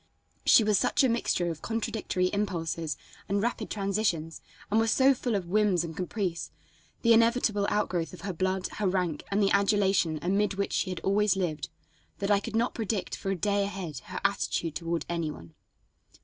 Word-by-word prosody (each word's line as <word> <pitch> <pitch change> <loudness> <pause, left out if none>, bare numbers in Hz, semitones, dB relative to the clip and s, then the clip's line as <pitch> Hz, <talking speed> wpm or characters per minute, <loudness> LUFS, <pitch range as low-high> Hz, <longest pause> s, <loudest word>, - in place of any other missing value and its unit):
She 225 - +7
was 210 -2 +3
such - - +2
a 260 - +4
mixture 180 -7 0
of 160 - -8
contradictory 220 -5 -1
impulses 165 -6 -2 0.3
and 200 +1 +1
rapid 225 0 -2
transitions, 195 -6 -1 0.3
and 220 - +4
was 225 0 +2
so 265 +4 +5
full 245 -3 -2
of 195 -3 -1
whims 195 -1 +2
and 165 -2 -6
caprice, 180 -2 -3 0.5
the 230 -1 +6
inevitable 230 -3 +3
outgrowth 180 -6 0
of 180 - -11
her 195 -2 -3
blood, 185 +2 -1
her 205 - +1
rank 180 -4 -1
and 200 +1 +2
the 195 - +3
adulation 200 -5 +3
amid 195 +2 +1
which 200 0 -2
she - - 0
had 180 -2 -4
always 205 +1 +2
lived, 160 -8 -2 0.5
that 200 +1 -1
I 200 - +5
could 220 +2 -6
not 235 +2 +1
predict 215 -3 -2
for 195 - -5
a 195 - +1
day 200 +3 +1
ahead 185 -8 -5
her - - -5
attitude 170 -5 0
toward 170 0 -2
any 170 -2 -2
one. 85 - -10
195 Hz, 185 wpm, -28 LUFS, 175-210 Hz, 0.5 s, She